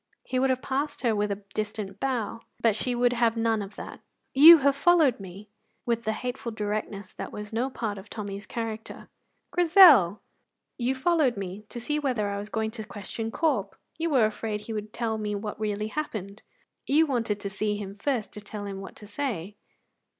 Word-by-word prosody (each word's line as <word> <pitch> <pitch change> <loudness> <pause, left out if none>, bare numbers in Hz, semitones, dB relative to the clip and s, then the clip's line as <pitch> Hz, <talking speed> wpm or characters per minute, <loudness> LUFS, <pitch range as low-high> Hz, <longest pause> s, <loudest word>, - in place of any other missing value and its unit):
He 255 - -1
would 265 +1 +2
have 255 0 0
passed 275 +3 -2
her 230 -4 +2
with 205 0 0
a 200 +1 -4
distant 210 -2 -4
bow, 240 -5 -2 0.2
but 225 -3 +3
she 245 +3 -1
would 245 0 +3
have 235 -1 +2
none 225 -1 +1
of 200 0 -8
that. - - -8 0.3
"You 320 +5 +11
have 280 -1 +2
followed 310 -5 +4
me," 190 0 -9
said - - -25
Grizel, 210 +1 -46
with 235 -1 0
the 220 - +1
hateful 245 +1 -4
directness 210 -2 -4
that - - -6
was 210 +1 -7
no 245 +4 0
part 215 -6 -4
of 195 - -13
Tommy's 205 -2 -6
character. 225 -1 -6 0.4
"Grizel!" 325 - +7 0.6
"You 250 +2 +1
followed 275 -4 +2
me 195 +2 -6
to 240 - -6
see 295 +6 -1
whether 245 -8 0
I 200 0 -3
was 205 +1 -6
going 220 0 -1
to 220 -1 -6
question 220 +2 -6
Corp. 225 - 0 0.2
You 335 +1 0
were 260 -7 +4
afraid 215 0 -3
he 225 - -6
would 210 0 -5
tell 225 -1 -2
me 210 -1 -2
what 210 +1 -5
really 210 0 -2
happened. 215 -8 -5 0.5
You 305 +4 +4
wanted 230 -7 -1
to 200 -1 -4
see 210 +1 -1
him 200 -1 -6
first 230 0 -2
to 210 - -8
tell 205 0 -7
him 195 -1 -6
what 195 - -10
to 210 - -11
say." 210 - -4
220 Hz, 200 wpm, -27 LUFS, 205-255 Hz, 0.6 s, You